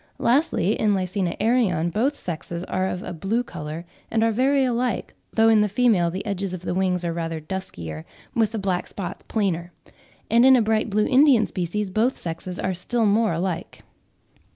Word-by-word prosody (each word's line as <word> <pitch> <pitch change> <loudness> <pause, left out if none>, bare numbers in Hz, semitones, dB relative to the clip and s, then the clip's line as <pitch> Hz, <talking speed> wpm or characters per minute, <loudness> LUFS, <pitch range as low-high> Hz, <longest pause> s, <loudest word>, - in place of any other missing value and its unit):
Lastly, 250 - +2
in 210 -2 +2
L. 185 -1 -1
arion 195 -8 +2
both 255 - +1
sexes 170 - -4
are 185 0 -1
of 180 0 -4
a - - -5
blue 200 +9 -1
colour 155 -5 -7 0.2
and 225 0 +1
are 225 - +3
very 265 +4 +2
like, 245 0 -1 0.2
though 225 0 +4
in 220 -1 +5
the 210 - +3
female 205 -5 +3
the 185 +4 -5
edges 195 -2 -3
of 180 - -10
the - - -2
wings 180 -1 0
are 170 - -1
rather 165 -1 -3
duskier, 85 - -6 0.3
with 225 -4 +2
the 225 - -3
black 190 -3 -1
spots 195 -1 -6
plainer; 180 -5 -1 0.6
and 235 +2 +4
in 265 0 +8
a - - +5
bright 220 +1 +1
blue 210 +1 +2
Indian 265 -3 +5
species 190 +2 -3
both 230 +7 +1
sexes 175 +2 -6
are 185 - -1
still 225 +6 0
more 215 0 +3
alike. 175 +1 -3
195 Hz, 185 wpm, -23 LUFS, 175-225 Hz, 0.6 s, in